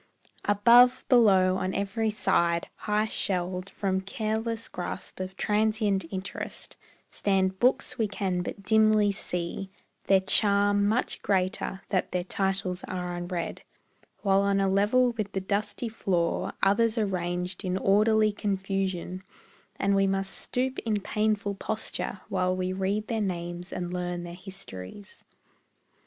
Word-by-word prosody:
Above, 235 Hz, +5 st, +6 dB
below, 190 Hz, -7 st, +5 dB
on 190 Hz, 0 st, -2 dB
every 200 Hz, +3 st, 0 dB
side, 170 Hz, -5 st, +1 dB
high 210 Hz, 0 st, 0 dB
shelved 185 Hz, -3 st, -1 dB
From 190 Hz, -2 st, -1 dB
careless 220 Hz, +2 st, -2 dB
grasp 180 Hz, +1 st, -6 dB
of 185 Hz, 0 st, -5 dB
transient 210 Hz, -3 st, +1 dB
interest, 190 Hz, 0 st, -6 dB, 0.4 s
Stand 190 Hz, -1 st, 0 dB
books 250 Hz, 0 st, +1 dB
we 220 Hz, -, +2 dB
can 190 Hz, -3 st, -2 dB
but 200 Hz, +2 st, -6 dB
dimly 215 Hz, 0 st, +4 dB
see, 180 Hz, -1 st, -4 dB, 0.4 s
their 195 Hz, -1 st, +5 dB
charm 205 Hz, +1 st, +3 dB
Much 225 Hz, +4 st, 0 dB
greater 190 Hz, 0 st, 0 dB
that 185 Hz, -3 st, -1 dB
their 180 Hz, -1 st, 0 dB
titles 190 Hz, -1 st, -1 dB
are 180 Hz, -1 st, -4 dB
unread; 175 Hz, -1 st, -4 dB, 0.6 s
While 195 Hz, -1 st, +4 dB
on 200 Hz, 0 st, +2 dB
a 195 Hz, -, +2 dB
level 210 Hz, +6 st, +3 dB
with 215 Hz, -4 st, -4 dB
the 195 Hz, -, 0 dB
dusty 205 Hz, +4 st, -2 dB
floor 180 Hz, -6 st, -1 dB
Others 220 Hz, +4 st, +3 dB
are 220 Hz, -, +2 dB
ranged 180 Hz, 0 st, -3 dB
in 185 Hz, -1 st, -1 dB
orderly 215 Hz, +2 st, +3 dB
confusion, 195 Hz, -3 st, -2 dB, 0.5 s
And 200 Hz, -, +1 dB
we 195 Hz, 0 st, +3 dB
must 195 Hz, 0 st, 0 dB
stoop 260 Hz, +1 st, -2 dB
in 215 Hz, -3 st, -1 dB
painful 210 Hz, 0 st, 0 dB
posture 205 Hz, -1 st, -3 dB
while 185 Hz, -1 st, 0 dB
We 185 Hz, 0 st, -2 dB
read 195 Hz, +3 st, -1 dB
their 225 Hz, 0 st, -2 dB
names 175 Hz, -2 st, -3 dB
and 175 Hz, 0 st, -4 dB
learn 175 Hz, -1 st, -3 dB
their 175 Hz, 0 st, -7 dB
histories. 185 Hz, -, -9 dB
195 Hz, 135 wpm, -27 LUFS, 185-215 Hz, 0.6 s, Above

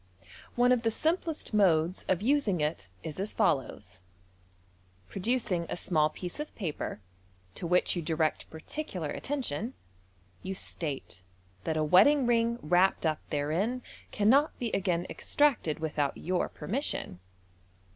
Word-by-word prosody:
One 245 Hz, +1 st, +4 dB
of 250 Hz, -2 st, +4 dB
the 230 Hz, -, +2 dB
simplest 320 Hz, +3 st, -1 dB
modes 180 Hz, -4 st, +3 dB
of 185 Hz, +1 st, +1 dB
using 245 Hz, -, +2 dB
it 150 Hz, -, -2 dB
is 155 Hz, +2 st, -6 dB
as 200 Hz, +2 st, -2 dB
follows: 105 Hz, -, -1 dB, 1.1 s
Producing 195 Hz, -5 st, -1 dB
a -, -, -2 dB
small 155 Hz, -4 st, +2 dB
piece 180 Hz, -, -7 dB
of 300 Hz, -, -6 dB
paper, 160 Hz, -, -4 dB, 0.5 s
to 170 Hz, -, -5 dB
which 180 Hz, +2 st, +3 dB
you 175 Hz, -, -1 dB
direct 155 Hz, -1 st, -1 dB
particular 160 Hz, -, -5 dB
attention, 255 Hz, -, -3 dB, 0.7 s
you 190 Hz, +1 st, -4 dB
•tate 140 Hz, -, -4 dB, 0.4 s
that 160 Hz, -, 0 dB
a 155 Hz, -, +2 dB
wedding 215 Hz, -, +6 dB
ring 235 Hz, 0 st, +2 dB
wrapped 180 Hz, +3 st, +3 dB
up 155 Hz, -1 st, +1 dB
therein 175 Hz, +13 st, -1 dB, 0.3 s
cannot 265 Hz, +9 st, +3 dB
be 235 Hz, -3 st, -2 dB
again 180 Hz, -3 st, 0 dB
extracted 275 Hz, -, +1 dB
without 150 Hz, -3 st, -1 dB
your 180 Hz, +1 st, -1 dB
permission. 215 Hz, -, -3 dB
185 Hz, 130 wpm, -30 LUFS, 155-240 Hz, 1.1 s, wedding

